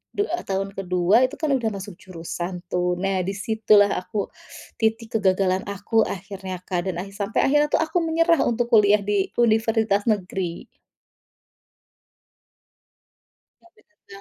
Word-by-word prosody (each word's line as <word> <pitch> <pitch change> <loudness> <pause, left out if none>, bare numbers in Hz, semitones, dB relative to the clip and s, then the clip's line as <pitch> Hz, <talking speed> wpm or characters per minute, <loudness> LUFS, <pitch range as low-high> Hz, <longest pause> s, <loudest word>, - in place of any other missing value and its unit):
du 410 - +1 0.3
tahun 195 +1 -1
ke-2 180 0 +1
itu - - -10
kan 310 -3 0
sudah 245 -4 +1
masuk 195 0 -8
jurusan 175 0 -6 0.2
tuh. 180 0 0
Nah, 195 -1 0
di 195 - -1
situlah 210 -1 +3
aku 200 +2 -4 0.5
titik 225 0 0
kegagalan 190 -1 +1
aku 205 +3 +1
akhirnya, 190 0 -6
Kak, 180 0 -2
dan 180 - -3
akhi 195 - -11
sampai 205 +1 -1
akhirnya 295 +2 +3
itu - - +3
aku 320 +2 -2
menyerah 330 -1 +3
untuk 235 0 -1
kuliah 210 -2 +5
di, 200 -1 0
universitas 220 -3 +2
negeri. 185 -4 -2 2.9
Nggak 345 - -24
bisa, 310 - -17
205 Hz, 135 wpm, -23 LUFS, 190-225 Hz, 2.9 s, kuliah